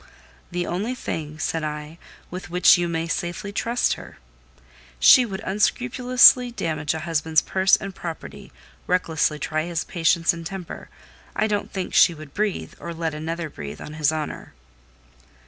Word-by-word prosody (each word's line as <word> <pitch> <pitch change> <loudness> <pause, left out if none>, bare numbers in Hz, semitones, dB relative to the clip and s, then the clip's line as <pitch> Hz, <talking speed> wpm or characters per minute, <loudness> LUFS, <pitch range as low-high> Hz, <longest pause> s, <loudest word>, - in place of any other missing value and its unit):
"The 175 0 -2
only 205 +9 -2
thing," 155 -9 -5
said 160 0 -2
I, 150 +2 -6 0.3
"with 180 0 -7
which 180 +1 +6
you 175 -1 0
may 165 -1 -2
safely 175 +4 -3
trust 235 +4 0
her. - - -11 0.8
She 250 -2 +7
would 190 -2 -6
unscrupulously 250 +4 +4
damage 155 -9 -2
a 160 - -4
husband's 160 -1 +1
purse 190 0 +3
and 195 0 -6
property, 170 -3 -8 0.4
recklessly 160 -4 +1
try 155 +1 -2
his 170 -1 -2
patience 165 -1 +2
and 170 0 -8
temper: 180 0 -7 0.5
I 215 - +1
don't 205 -2 -2
think 190 -2 -4
she 170 - +5
would 155 -2 -12
breathe, 210 -1 -2
or 170 0 -6
let 165 -1 -2
another 165 +2 -4
breathe, 75 - -8
on 150 - -8
his 155 -1 +1
honour." 155 -2 -5
170 Hz, 155 wpm, -23 LUFS, 155-195 Hz, 0.8 s, She